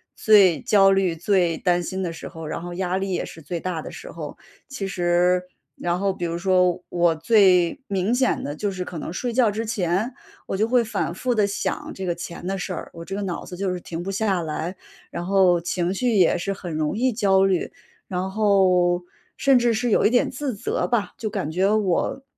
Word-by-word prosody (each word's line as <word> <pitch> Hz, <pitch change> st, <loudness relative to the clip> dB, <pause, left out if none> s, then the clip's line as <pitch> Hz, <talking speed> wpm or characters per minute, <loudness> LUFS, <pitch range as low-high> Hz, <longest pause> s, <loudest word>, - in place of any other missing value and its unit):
最 200 Hz, -6 st, +5 dB
焦 195 Hz, -2 st, +5 dB
虑、 190 Hz, -3 st, +2 dB
最 175 Hz, -1 st, +1 dB
担 175 Hz, -1 st, +1 dB
心 190 Hz, +2 st, -4 dB
的 175 Hz, -3 st, -2 dB
时 165 Hz, -, -8 dB
候， 160 Hz, -1 st, -8 dB
然 160 Hz, -, -4 dB
后 175 Hz, 0 st, -6 dB
压 185 Hz, 0 st, -1 dB
力 195 Hz, 0 st, -2 dB
也 -, -, -1 dB
是 165 Hz, -, -11 dB
最 170 Hz, +3 st, -4 dB
大 180 Hz, -2 st, -3 dB
的 -, -, -8 dB
时 -, -, -9 dB
候。 -, -, -7 dB, 0.3 s
其 250 Hz, -9 st, -5 dB
实 180 Hz, 0 st, +2 dB, 0.4 s
然 175 Hz, +1 st, -1 dB
后 200 Hz, 0 st, +1 dB
比 175 Hz, -, -4 dB
如 170 Hz, 0 st, -2 dB
说， 180 Hz, -1 st, +2 dB
我 175 Hz, -1 st, +2 dB
最， 180 Hz, -, +4 dB
明 200 Hz, +3 st, 0 dB
显 255 Hz, 0 st, +1 dB
的 145 Hz, -, -4 dB
就 205 Hz, +4 st, -2 dB
是 185 Hz, -1 st, -4 dB
可 175 Hz, -, -7 dB
能 160 Hz, -, -5 dB
睡 240 Hz, +6 st, -2 dB
觉 230 Hz, -3 st, +3 dB
之 220 Hz, +2 st, -3 dB
前， 215 Hz, +2 st, -1 dB, 0.3 s
我 195 Hz, -, -2 dB
就 220 Hz, +2 st, +2 dB
会 245 Hz, -1 st, +3 dB
反 215 Hz, -5 st, -2 dB
复 245 Hz, +6 st, -1 dB
地 210 Hz, -2 st, +3 dB
想 200 Hz, -, -3 dB
这 190 Hz, -1 st, -5 dB
个 170 Hz, -, 0 dB
钱 175 Hz, +1 st, -7 dB
的 195 Hz, +1 st, -1 dB
事 185 Hz, 0 st, -4 dB
儿， -, -, -6 dB
我 165 Hz, 0 st, -8 dB
这 195 Hz, -, -5 dB
个 205 Hz, -, -3 dB
脑 185 Hz, -3 st, -4 dB
子 180 Hz, -, -8 dB
就 190 Hz, 0 st, -2 dB
是 180 Hz, -, -3 dB
停 170 Hz, 0 st, -6 dB
不 190 Hz, -, -5 dB
下 195 Hz, -2 st, 0 dB
来。 165 Hz, +3 st, -4 dB, 0.4 s
然 175 Hz, -, -4 dB
后 185 Hz, -3 st, +4 dB
情 175 Hz, +1 st, -1 dB
绪 235 Hz, +2 st, 0 dB
也 185 Hz, -4 st, +4 dB
是 195 Hz, -, -2 dB
很 180 Hz, -4 st, -7 dB
容 155 Hz, +5 st, -1 dB
易 250 Hz, 0 st, +1 dB
焦 195 Hz, -3 st, +3 dB
虑， 185 Hz, -3 st, 0 dB, 0.4 s
然 185 Hz, +1 st, -3 dB
后， 185 Hz, -4 st, +3 dB, 0.3 s
甚 270 Hz, -3 st, +4 dB
至 240 Hz, -1 st, +2 dB
是 240 Hz, +1 st, 0 dB
有 -, -, +3 dB
一 -, -, +2 dB
点 245 Hz, 0 st, +2 dB
自 265 Hz, -2 st, -3 dB
责 200 Hz, -, -2 dB
吧。 240 Hz, -4 st, 0 dB
就 220 Hz, -, -4 dB
感 195 Hz, -7 st, -3 dB
觉 190 Hz, +4 st, +2 dB
我 210 Hz, +6 st, 0 dB
190 Hz, 240 characters per minute, -23 LUFS, 175-210 Hz, 0.4 s, 最